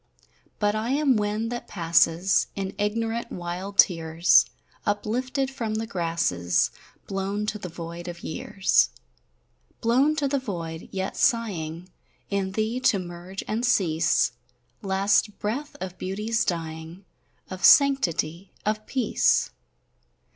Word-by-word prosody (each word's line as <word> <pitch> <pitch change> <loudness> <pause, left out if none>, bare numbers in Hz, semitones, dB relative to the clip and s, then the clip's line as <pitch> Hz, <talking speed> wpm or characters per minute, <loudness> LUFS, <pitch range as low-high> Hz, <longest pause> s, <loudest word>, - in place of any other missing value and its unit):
But 205 -1 +1
I 215 +2 -2
am 285 -3 +3
wind 210 +2 -1
that 240 - -5
passes 170 +1 +2
In 195 -1 -3
ignorant 225 +3 -1
wild 180 +3 -5
tears, 165 -2 +5 0.4
Uplifted 255 +6 -1
from 225 -5 -3
the 220 +1 -2
grasses, 165 - 0 0.3
Blown 195 +2 -2
to 210 0 -3
the 180 - -6
void 170 +1 -7
of 170 -1 -7
years, 190 +4 +1 0.9
Blown 260 +6 +3
to 290 -2 0
the 275 0 0
void, 170 -9 -6
yet 190 0 -3
sighing 180 -7 0 0.4
In 195 -1 -1
thee 220 +4 -1
to 255 -4 +3
merge 180 +1 -7
and 220 +3 -1
cease, 175 -10 +2 0.5
Last 200 +1 +1
breath 260 +8 -3
of 185 0 -6
beauty's 210 +4 -1
dying, 165 +1 -4 0.5
Of 185 0 -7
sanctity, 190 - +4
of 215 0 -1
peace! 255 -5 +2
195 Hz, 120 wpm, -25 LUFS, 175-225 Hz, 0.9 s, tears